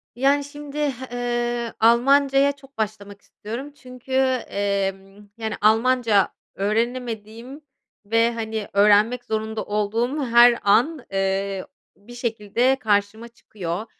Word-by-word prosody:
Yani, 280 +3 +2
şimdi, 290 0 -10 0.4
ııı, 240 -1 -2
Almancaya 275 +4 +4
çok 275 -2 -18
başlamak 205 -2 -5
istiyorum 240 +7 -8
çünkü, 255 -2 -14 0.4
emm, 200 0 -3
yani, 220 -1 -3
Almanca 225 -1 +3 0.3
öğrenemediğim 230 +4 -3 0.4
ve, 230 +2 +2
hani, 220 -2 -4
öğrenmek 210 +4 +4
zorunda 220 -1 -3
olduğum 230 +7 -1
her 235 0 +6
an, 245 +7 +2
eee, 195 0 -1 0.3
bir 205 +5 -15
şekilde 235 +1 0
karşıma 215 +1 0
çıkıyor. 200 -4 -6
230 Hz, 105 wpm, -22 LUFS, 205-250 Hz, 0.4 s, her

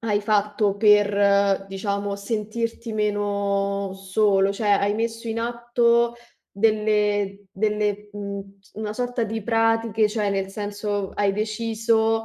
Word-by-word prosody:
hai 210 -3 0
fatto 210 -1 +1
per, 200 -1 +4
diciamo, 200 +1 -3
sentirti 225 +3 -3
meno 200 -2 -1
solo, 195 0 +2
cioè, 210 +2 -3
hai 200 +1 +2
messo 230 +1 -3
in 225 - -2
atto 235 0 +1 0.4
delle 210 -2 +1
delle, 210 0 -1
mhmm, 200 -1 -7
s 195 - -26
una 215 -1 -4
sorta 245 +1 -2
di 220 +1 -4
pratiche, 225 -1 +2
cioè 210 -1 -1
nel 195 -1 -1
senso 205 0 -3
hai 200 -1 +1
deciso: 225 +1 0
210 Hz, 125 wpm, -23 LUFS, 200-225 Hz, 0.4 s, per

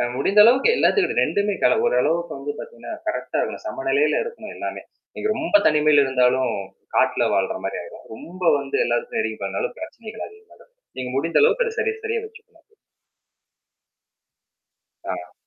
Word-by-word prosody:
அ 120 0 0
முடிந்த 200 +9 +5
அளவுக்கு 260 - +5
எல்லாகிட்டையும் 400 -2 +2
2மே 205 0 0
கல 220 - +4
ஒரு 125 - +2
அளவுக்கு 170 +2 -1
வந்து 145 +1 -4
பார்த்தீங்கன்னா, 480 +1 -8
கரெக்டா - - -3
இருக்கணும். - - -4
சமநிலையில 385 +9 +1
இருக்கணும், 470 0 -8
எல்லாமே. - - -5 0.3
நீங்க 430 - -2
ரொம்ப 320 -1 +2
தனிமையில 150 -1 +4
இருந்தாலும், 125 -1 +2 0.4
காட்டுல - - +3
வாழுற - - 0
மாரி - - -3
ஆயிரும். - - -12
ரொம்ப 180 +10 -11 0.2
வந்து 135 0 -3
எல்லாத்துலயும் 120 0 -1
நெருங்கி 110 -1 -3
பழகுனாலும் 95 0 -3
பிரச்சனைகள் 225 -8 -8
அதிகமா 435 +1 -19
ஆயிடும். - - -22 0.2
நீங்க 125 -1 -4
முடிந்த 165 +4 +1
அளவுக்கு 485 +2 +4
அதைச் 440 -1 -5
சரிக்கு 445 0 -1
சரியா 450 +1 -1
வச்சுக்கறது 435 -5 -15
நல்லது. 420 +7 -28 2.4
ஆ. - - -6
215 Hz, 155 wpm, -22 LUFS, -, 2.4 s, முடிந்த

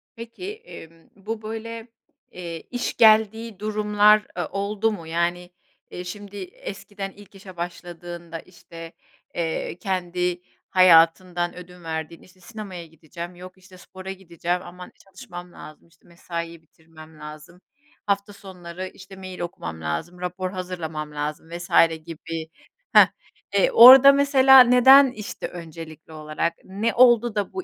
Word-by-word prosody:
Peki, 230 - -8
emm, 165 - -14
bu 215 +3 -6
böyle, 225 +1 -7 0.4
eee, 170 -2 -7
iş 245 - -3
geldiği 220 -1 +3
durumlar, 210 0 +3
aaa, 175 -2 -3
oldu 205 +2 -1
mu? 170 -6 -8
Yani, 175 +2 -2 0.4
eee, 180 - -7
şimdi 205 +2 -9
eskiden 195 +2 -8
ilk 200 0 -18
işe 190 -2 -13
başladığında, 175 -1 -7
işte, 165 -2 -13 0.4
eee, 165 -1 -3
kendi 180 -1 -2 0.3
hayatından 175 0 +4
ödün 180 0 -13
verdiğinde, 160 0 -6
işte, 185 0 -23
sinemaya 185 -3 -9
gideceğim, 170 +2 -10
yok, 185 +1 -12
işte, 185 0 -18
spora 190 +1 -10
gideceğim 175 -1 -4
aman 180 0 -11
çalışmam 180 -2 -11
lazım, 155 +2 -13
işte, 165 0 -28
mesaiye 170 -1 -7
bitirmem 160 -1 -18
lazım, 150 +4 -12 0.4
hafta 200 0 -1
sonları, 185 -2 -9
işte, 190 +1 -13
mail 185 -1 -9
okumam 80 - -6
lazım, 150 - -5
rapor 180 +1 -4
hazırlamam 170 -5 -6
lazım 150 +2 -5
vs. 175 +1 -8 0.4
gibi 165 -1 -7 0.5
Hah, - - +8 0.5
eee, - - +3
orada 265 - +10
mesela 270 -1 +6
neden, 255 +2 +7
işte, 210 -3 -7
öncelikli 160 -2 -11
olarak, 155 +2 -3
ne 205 +5 -2
oldu 240 -2 +4
da 205 -2 -2
bu 370 -1 -4
180 Hz, 130 wpm, -23 LUFS, 170-205 Hz, 0.5 s, orada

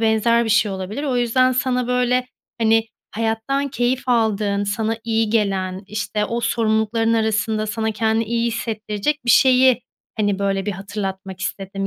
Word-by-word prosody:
benzer 230 +1 +3
bir 225 - -2
şey 210 -1 +3
olabilir. 190 +7 -5
O 265 -4 0
yüzden 255 +2 +3
sana 250 -1 0
böyle, 250 0 +1 0.3
hani, 225 0 +3 0.3
hayattan 225 +6 -1
keyif 250 0 -1
aldığın, 210 -4 +1
sana 220 +2 -1
iyi 225 -1 0
gelen, 195 -4 0
işte, 210 0 -2
o 235 +2 -2
sorumlulukların 225 0 +1
arasında 220 -1 0
sana 220 +1 -2
kendini 220 +1 +1
iyi 235 +1 -1
hissettirecek 225 +4 -2
bir 240 - +2
şeyi, 255 +1 +5 0.4
hani, 205 -3 0
böyle 195 -1 -1
bir - - 0
hatırlatmak 195 -1 -6
istedim. 195 0 -4
220 Hz, 150 wpm, -21 LUFS, 205-235 Hz, 0.4 s, şeyi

